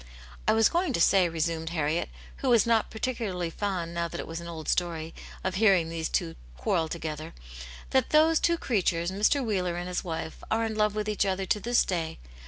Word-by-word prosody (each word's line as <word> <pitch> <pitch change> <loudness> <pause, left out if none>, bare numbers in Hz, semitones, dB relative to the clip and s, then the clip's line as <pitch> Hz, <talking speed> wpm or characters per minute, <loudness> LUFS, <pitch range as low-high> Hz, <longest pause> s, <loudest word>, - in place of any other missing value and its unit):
I - - +5
was 225 0 +5
going 345 -4 0
to - - 0
say," 185 0 +5
resumed 165 0 -2
Harriet, 160 0 -1 0.3
who 265 - -1
was 235 -2 +5
not 230 -2 +2
particularly 220 -8 -3
fond, 180 -3 -3
now 170 0 -1
that - - -7
it - - -4
was 165 +1 -6
an 170 - -8
old 160 -2 -7
story, 165 -2 -1 0.3
of 190 - -1
hearing 190 -5 +4
these 165 -1 -3
two 80 - -1 0.2
quarrel 160 - 0
together, 155 -1 -5 0.6
"that 260 -2 +2
those 315 +1 +5
two 340 0 +2
creatures, 175 - 0
Mr. 215 +8 +2
Wheeler 185 -5 0
and 175 +1 -4
his 180 -1 -2
wife, 160 -2 -5
are 225 +1 +1
in 220 - -2
love 210 -1 +1
with 210 0 -2
each 210 -1 +1
other 190 -1 -1
to 210 - +1
this 240 +3 +2
day. 165 -3 -2
180 Hz, 205 wpm, -28 LUFS, 165-220 Hz, 0.6 s, I